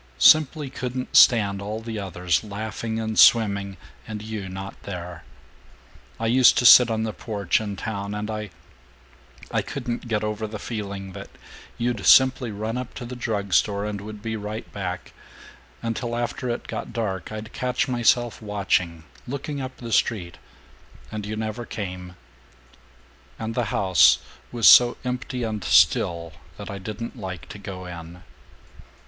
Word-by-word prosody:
Simply 155 Hz, -2 st, +5 dB
couldn't 130 Hz, -1 st, -5 dB
stand 100 Hz, -4 st, +6 dB
all 105 Hz, +2 st, -4 dB
the 115 Hz, -1 st, -5 dB
others 90 Hz, -3 st, -1 dB
laughing 110 Hz, +2 st, -4 dB
and 110 Hz, -1 st, -2 dB
swimming, 100 Hz, -4 st, +4 dB, 0.3 s
and 105 Hz, -1 st, -6 dB
you 110 Hz, -3 st, -5 dB
not 95 Hz, +1 st, -8 dB
there. 90 Hz, -3 st, -7 dB, 1.0 s
I 115 Hz, -, -2 dB
used 125 Hz, +2 st, +5 dB
to 125 Hz, -, +2 dB
sit 125 Hz, 0 st, +9 dB
on 110 Hz, -1 st, -1 dB
the 110 Hz, -1 st, -3 dB
porch, 105 Hz, -3 st, -1 dB
in 100 Hz, -2 st, -4 dB
town, 100 Hz, 0 st, -4 dB
and 105 Hz, +1 st, -4 dB
I 105 Hz, -1 st, -5 dB, 1.0 s
I -, -, +1 dB
couldn't 120 Hz, 0 st, -5 dB
get 110 Hz, -2 st, -1 dB
over 105 Hz, 0 st, -3 dB
the 105 Hz, 0 st, -6 dB
feeling 100 Hz, -3 st, -6 dB
that -, -, -9 dB, 0.5 s
you'd 120 Hz, -3 st, -2 dB
simply 130 Hz, -2 st, +5 dB
run 110 Hz, +3 st, -3 dB
up 125 Hz, -1 st, -7 dB
to 125 Hz, -, -6 dB
the 125 Hz, +1 st, -7 dB
drug 105 Hz, -5 st, -3 dB
store 100 Hz, +1 st, +2 dB
and 105 Hz, -1 st, -4 dB
would 105 Hz, 0 st, -9 dB
be 110 Hz, -1 st, -3 dB
right 105 Hz, +1 st, -5 dB
back, 90 Hz, -3 st, -5 dB, 0.7 s
and 115 Hz, -1 st, -2 dB
till 120 Hz, -2 st, -3 dB
after 120 Hz, +1 st, -3 dB
it 120 Hz, -, -3 dB
got -, -, -5 dB
dark 100 Hz, -6 st, -3 dB
I'd 110 Hz, +1 st, -7 dB
catch 125 Hz, 0 st, -1 dB
myself 120 Hz, -1 st, +1 dB
watching, 95 Hz, -5 st, -1 dB, 0.2 s
looking 140 Hz, +2 st, -4 dB
up 130 Hz, 0 st, -7 dB
the 115 Hz, -2 st, -8 dB
street, 90 Hz, -7 st, 0 dB, 0.7 s
and 105 Hz, -1 st, -5 dB
you 110 Hz, -, -3 dB
never 110 Hz, +2 st, -4 dB
came, 90 Hz, -5 st, -6 dB, 1.2 s
and 110 Hz, 0 st, -4 dB
the 120 Hz, 0 st, 0 dB
house 90 Hz, -, +5 dB, 0.3 s
was 120 Hz, -3 st, +3 dB
so 120 Hz, -1 st, +8 dB
empty 125 Hz, 0 st, -3 dB
and 110 Hz, -3 st, -3 dB
still 85 Hz, -1 st, +3 dB, 0.2 s
that -, -, -7 dB
I 100 Hz, -, -6 dB
didn't 110 Hz, +6 st, -6 dB
like 95 Hz, -3 st, -7 dB
to 105 Hz, -, -9 dB
go 95 Hz, -2 st, -7 dB
in. 85 Hz, 0 st, -9 dB
110 Hz, 160 wpm, -24 LUFS, 100-120 Hz, 1.2 s, sit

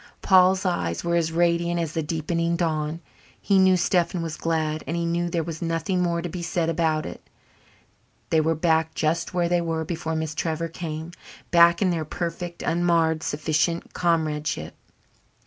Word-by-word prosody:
Paul's 185 Hz, 0 st, +5 dB
eyes 85 Hz, -, -1 dB
were 170 Hz, -, -1 dB
as 165 Hz, -1 st, +1 dB
radiant 170 Hz, +1 st, +1 dB
as 165 Hz, -2 st, -2 dB
the 165 Hz, -, -1 dB
deepening 165 Hz, +2 st, -1 dB
dawn. 160 Hz, -1 st, -1 dB, 0.4 s
He 195 Hz, -2 st, +3 dB
knew 190 Hz, -1 st, +5 dB
Stephen 175 Hz, -1 st, +1 dB
was 165 Hz, -2 st, -4 dB
glad 155 Hz, -1 st, -1 dB
and 165 Hz, -, -2 dB
he 170 Hz, -, -1 dB
knew 170 Hz, +1 st, 0 dB
there 170 Hz, -1 st, -1 dB
was 160 Hz, 0 st, -6 dB
nothing 165 Hz, +2 st, -1 dB
more 170 Hz, -1 st, 0 dB
to -, -, -2 dB
be 175 Hz, +1 st, -5 dB
said 170 Hz, -1 st, -1 dB
about 160 Hz, -2 st, 0 dB
it. -, -, -8 dB, 1.1 s
They 160 Hz, -, +4 dB
were 160 Hz, +1 st, +1 dB
back 160 Hz, 0 st, +1 dB
just 165 Hz, +3 st, -1 dB
where 175 Hz, -1 st, +2 dB
they 175 Hz, 0 st, +2 dB
were 165 Hz, -1 st, -2 dB
before 160 Hz, -1 st, -3 dB
Miss 160 Hz, -1 st, -2 dB
Trevor 165 Hz, +1 st, -2 dB
came 160 Hz, 0 st, -6 dB, 0.4 s
back 170 Hz, +1 st, +6 dB
in 185 Hz, -, +2 dB
their 165 Hz, -2 st, -1 dB
perfect, 170 Hz, +2 st, -5 dB
unmarred, 165 Hz, -2 st, +2 dB
sufficient 155 Hz, +3 st, -1 dB
comradeship. 155 Hz, -3 st, -1 dB
165 Hz, 170 wpm, -24 LUFS, 160-175 Hz, 1.1 s, back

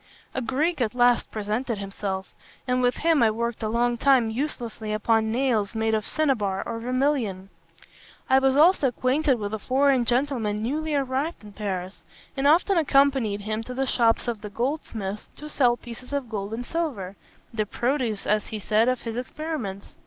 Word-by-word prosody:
"A 260 Hz, -, -2 dB
Greek 275 Hz, +6 st, 0 dB
at 235 Hz, 0 st, 0 dB
last 245 Hz, -1 st, +3 dB
presented 220 Hz, +3 st, -2 dB
himself; 195 Hz, -1 st, -4 dB, 0.3 s
and 250 Hz, 0 st, +1 dB
with 245 Hz, 0 st, +2 dB
him 325 Hz, -4 st, +2 dB
I 225 Hz, -, +5 dB
worked 235 Hz, +2 st, -2 dB
a 215 Hz, -, -1 dB
long 240 Hz, +1 st, +1 dB
time 260 Hz, -5 st, +4 dB
uselessly 230 Hz, -4 st, -4 dB
upon 220 Hz, +1 st, +2 dB
nails 230 Hz, -4 st, 0 dB
made 220 Hz, 0 st, +1 dB
of 215 Hz, -2 st, 0 dB
cinnabar 220 Hz, -11 st, 0 dB
or 230 Hz, -1 st, -3 dB
vermilion. 245 Hz, -6 st, -1 dB, 0.8 s
I 265 Hz, 0 st, +5 dB
was 270 Hz, 0 st, +2 dB
also 320 Hz, -2 st, +5 dB
acquainted 255 Hz, +3 st, +1 dB
with 205 Hz, -1 st, -4 dB
a 220 Hz, -, -2 dB
foreign 265 Hz, +2 st, +2 dB
gentleman 240 Hz, -4 st, 0 dB
newly 305 Hz, +5 st, -1 dB
arrived 275 Hz, +2 st, -1 dB
in 210 Hz, -1 st, -12 dB
Paris, 190 Hz, -2 st, -4 dB, 0.3 s
and 275 Hz, 0 st, +1 dB
often 345 Hz, +4 st, +4 dB
accompanied 275 Hz, -8 st, +3 dB
him 215 Hz, +2 st, -3 dB
to 250 Hz, +2 st, -7 dB
the 270 Hz, +1 st, 0 dB
shops 235 Hz, -3 st, +2 dB
of 230 Hz, -3 st, -2 dB
the 210 Hz, -, -6 dB
goldsmiths 220 Hz, -4 st, -3 dB
to 300 Hz, -, -9 dB
sell 245 Hz, -4 st, +3 dB
pieces 245 Hz, +3 st, -10 dB
of 275 Hz, -4 st, -2 dB
gold 205 Hz, -2 st, -4 dB
and 245 Hz, +2 st, -5 dB
silver, 245 Hz, -, -3 dB, 0.4 s
the 215 Hz, -2 st, -1 dB
produce, 240 Hz, -3 st, -1 dB
as 210 Hz, 0 st, +1 dB
he 215 Hz, -, -5 dB
said, 215 Hz, +4 st, +2 dB
of 255 Hz, -1 st, -1 dB
his 230 Hz, -1 st, -4 dB
experiments. 250 Hz, -6 st, -5 dB
240 Hz, 175 wpm, -25 LUFS, 215-270 Hz, 0.8 s, I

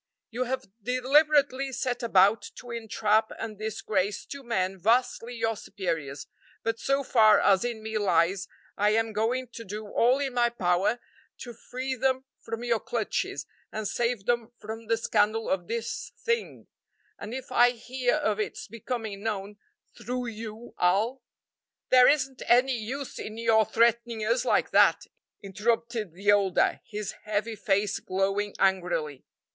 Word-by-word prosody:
You 250 Hz, +3 st, -2 dB
have 260 Hz, +1 st, -3 dB, 0.2 s
deliberately 275 Hz, +2 st, +3 dB
set 250 Hz, -1 st, -2 dB
about 205 Hz, -1 st, +4 dB
to 245 Hz, -, -10 dB
entrap 220 Hz, -1 st, +1 dB
and 215 Hz, -2 st, -6 dB
disgrace 205 Hz, -2 st, -2 dB
two 280 Hz, -, -8 dB
men 195 Hz, -6 st, -1 dB
vastly 235 Hz, +3 st, +1 dB
your 225 Hz, -1 st, 0 dB
superiors, 165 Hz, -9 st, -4 dB, 0.4 s
but 225 Hz, 0 st, -1 dB
so 275 Hz, +1 st, +1 dB
far 215 Hz, -5 st, +5 dB
as 195 Hz, -2 st, +4 dB
in 235 Hz, -3 st, -4 dB
me 220 Hz, 0 st, -2 dB
lies 185 Hz, 0 st, +2 dB, 0.3 s
I 210 Hz, +1 st, +2 dB
am 225 Hz, 0 st, 0 dB
going 240 Hz, +4 st, -1 dB
to 235 Hz, -1 st, -9 dB
do 210 Hz, +1 st, -6 dB
all 245 Hz, +5 st, +3 dB
in 275 Hz, -2 st, -2 dB
my 240 Hz, -1 st, +3 dB
power 200 Hz, +1 st, +1 dB, 0.4 s
to 240 Hz, -, -7 dB
free 255 Hz, +3 st, -5 dB
them 260 Hz, +1 st, 0 dB
from 225 Hz, +1 st, -6 dB
your 235 Hz, -2 st, +1 dB
clutches 225 Hz, -1 st, -2 dB, 0.3 s
and 215 Hz, -1 st, -3 dB
save 235 Hz, -3 st, -1 dB
them 240 Hz, -1 st, 0 dB
from 220 Hz, +1 st, -8 dB
the 230 Hz, 0 st, +2 dB
scandal 220 Hz, 0 st, +1 dB
of 180 Hz, -2 st, -1 dB
this 230 Hz, 0 st, -4 dB
thing, 465 Hz, 0 st, -2 dB, 0.5 s
and 215 Hz, -, -7 dB
if 260 Hz, +2 st, -6 dB
I 245 Hz, 0 st, +6 dB
hear 245 Hz, +2 st, -1 dB
of 215 Hz, -9 st, 0 dB
its 215 Hz, -, -4 dB
becoming 220 Hz, -2 st, -5 dB
known 205 Hz, -1 st, -4 dB, 0.4 s
through 245 Hz, +1 st, -4 dB
you 220 Hz, +1 st, -8 dB
I'll 210 Hz, +9 st, +2 dB, 0.3 s
" -, -, -63 dB
"There 255 Hz, -1 st, +8 dB
isn't 270 Hz, -3 st, +1 dB
any 255 Hz, +2 st, +4 dB
use 250 Hz, +5 st, -5 dB
in 215 Hz, +1 st, -6 dB
your 225 Hz, -1 st, +3 dB
threatening 235 Hz, 0 st, +2 dB
us 235 Hz, +3 st, +1 dB
like -, -, +2 dB
that," -, -, +5 dB, 0.4 s
interrupted 220 Hz, 0 st, -1 dB
the 200 Hz, +4 st, +2 dB
older, 200 Hz, -3 st, +2 dB
his 210 Hz, -1 st, -4 dB
heavy 215 Hz, +2 st, -1 dB
face 205 Hz, -1 st, 0 dB
glowing 195 Hz, +2 st, -1 dB
angrily. 175 Hz, -7 st, 0 dB
225 Hz, 150 wpm, -27 LUFS, 205-245 Hz, 0.5 s, There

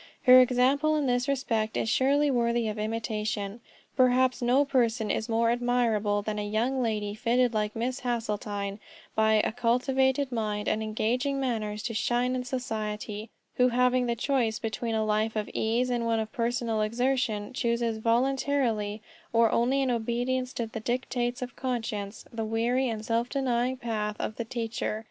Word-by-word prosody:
Her 255 Hz, 0 st, +9 dB
example 260 Hz, +5 st, +3 dB
in 300 Hz, -2 st, 0 dB
this 245 Hz, 0 st, +1 dB
respect 230 Hz, -6 st, -1 dB
is -, -, 0 dB
surely 280 Hz, +5 st, +3 dB
worthy 235 Hz, -2 st, +1 dB
of 215 Hz, 0 st, -3 dB
imitation. 215 Hz, -1 st, -3 dB, 0.4 s
Perhaps 255 Hz, 0 st, +3 dB
no 250 Hz, +4 st, +3 dB
person 235 Hz, -5 st, +1 dB
is 220 Hz, -, -2 dB
more 230 Hz, +1 st, +2 dB
admirable 235 Hz, -4 st, +1 dB
than 210 Hz, 0 st, -3 dB
a -, -, -2 dB
young 240 Hz, +5 st, 0 dB
lady 210 Hz, -3 st, -1 dB
fitted 240 Hz, +3 st, +1 dB
like 210 Hz, -1 st, -1 dB
Miss 250 Hz, +4 st, -2 dB
Hasseltine 210 Hz, -4 st, -3 dB, 0.3 s
by 220 Hz, 0 st, +3 dB
a 215 Hz, -, +2 dB
cultivated 260 Hz, +3 st, +1 dB
mind 210 Hz, -3 st, -2 dB
and 215 Hz, -, +1 dB
engaging 245 Hz, +6 st, -1 dB
manners 215 Hz, -5 st, -2 dB
to 230 Hz, -, -3 dB
shine 240 Hz, +3 st, +1 dB
in 250 Hz, -, -2 dB
society, 215 Hz, -4 st, -4 dB, 0.3 s
who 250 Hz, -, +5 dB
having 250 Hz, 0 st, +2 dB
the 235 Hz, -, 0 dB
choice 240 Hz, -3 st, 0 dB
between 225 Hz, +1 st, -3 dB
a 220 Hz, 0 st, +1 dB
life 215 Hz, +1 st, 0 dB
of 215 Hz, -1 st, -1 dB
ease 240 Hz, +3 st, 0 dB
and 235 Hz, -1 st, 0 dB
one 225 Hz, -1 st, +1 dB
of 220 Hz, 0 st, -3 dB
personal 235 Hz, -2 st, -1 dB
exertion, 230 Hz, -1 st, 0 dB
chooses 235 Hz, -3 st, 0 dB
voluntarily, 230 Hz, -3 st, 0 dB, 0.3 s
or 230 Hz, -1 st, +4 dB
only 265 Hz, +4 st, +2 dB
in 260 Hz, -, +1 dB
obedience 245 Hz, +2 st, -1 dB
to 235 Hz, -, -2 dB
the 225 Hz, 0 st, -6 dB
dictates 245 Hz, +1 st, -2 dB
of 250 Hz, -, -8 dB
conscience, 225 Hz, -5 st, -4 dB
the 225 Hz, -1 st, -3 dB
weary 235 Hz, +4 st, 0 dB
and 220 Hz, -1 st, -4 dB
self 230 Hz, +2 st, 0 dB
denying 255 Hz, -2 st, 0 dB
path 215 Hz, -3 st, -2 dB
of 215 Hz, -, -4 dB
the 235 Hz, -, -3 dB
teacher. 225 Hz, -2 st, -3 dB
235 Hz, 165 wpm, -28 LUFS, 220-250 Hz, 0.4 s, Her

